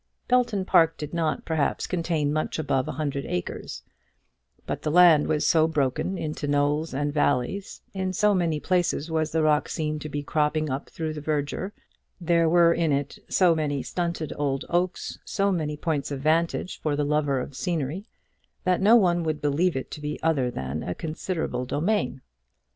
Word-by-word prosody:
Belton 240 -6 +2
Park 165 -3 +4
did 150 +1 -6
not, 165 -2 -1
perhaps, 160 -3 0
contain 165 -4 -1
much 155 0 -1
above 135 -4 0
a - - -3
hundred 140 -1 -2
acres, 90 - -4 0.8
but - - -4
the 155 - -1
land 165 -2 +6
was 155 -1 +1
so 160 -2 +4
broken 150 +4 -1
into 155 -2 -4
knolls 145 +2 +1
and 145 +2 -2
valleys, 145 +6 0
in 190 -1 -2
so 210 +3 +3
many 170 -5 +1
places 175 -2 0
was 160 -1 0
the 160 0 +1
rock 150 -1 +2
seen 155 -1 -2
to 155 - -6
be 145 0 -3
cropping 155 0 0
up 135 +2 -4
through 160 -1 -4
the 150 - -6
verdure, 150 +5 -2 0.5
there 170 -1 +2
were 170 0 +5
in 165 -2 +1
it 140 0 -2
so 180 -3 +4
many 145 -4 -1
stunted 170 -3 -3
old 140 -2 -1
oaks, 175 +1 -1
so 200 -1 0
many 155 -5 -2
points 150 -3 -2
of 140 -2 -4
vantage 165 +5 0
for 150 -2 0
the 145 0 0
lover 145 -2 +1
of 130 +2 -6
scenery, 170 - -2 0.6
that 185 0 +1
no 215 +4 +7
one 175 -6 +4
would 155 -2 -1
believe 150 +4 +1
it 130 - -4
to 150 - -7
be 150 0 -4
other 145 -6 +2
than 70 - -4
a 90 - -4
considerable 160 -4 -3
domain. 155 - -1
155 Hz, 180 wpm, -26 LUFS, 145-170 Hz, 0.8 s, no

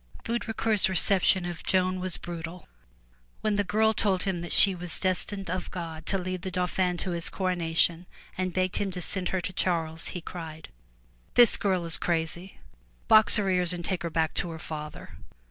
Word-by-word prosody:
Baudricourt's 225 -3 0
reception 190 0 +2
of 175 -2 -6
Joan 185 0 0
was 185 -1 -2
brutal. 170 0 -8 0.7
When 215 - 0
the 205 0 +1
girl 220 +3 +1
told 195 -4 +2
him 190 -3 -2
that 175 - -6
she 195 - +6
was 180 -1 -3
destined 195 +1 +1
of 185 0 -4
God 165 -3 -7
to 195 - +2
lead 185 -1 -4
the 185 - -5
Dauphin 180 0 -1
to 180 - -3
his 170 -1 0
coronation, 175 -2 0 0.3
and 185 0 -2
begged 185 0 -1
him 200 - -1
to 180 - -5
send 185 0 0
her 185 - -2
to 185 - -6
Charles, 165 -3 -1
he 180 - -5
cried: 160 -2 -9 0.7
"The 240 -2 +9
girl 185 -4 0
is 165 - +3
crazy! 170 +2 -3 0.5
Box 215 -2 +6
her 205 -3 +1
ears 180 -2 +1
and 175 -1 -6
take 185 -3 -2
her 170 - -3
back 160 -1 -1
to 175 - -2
her 165 - -7
father.'' 150 -1 -8
180 Hz, 185 wpm, -27 LUFS, 170-190 Hz, 0.7 s, The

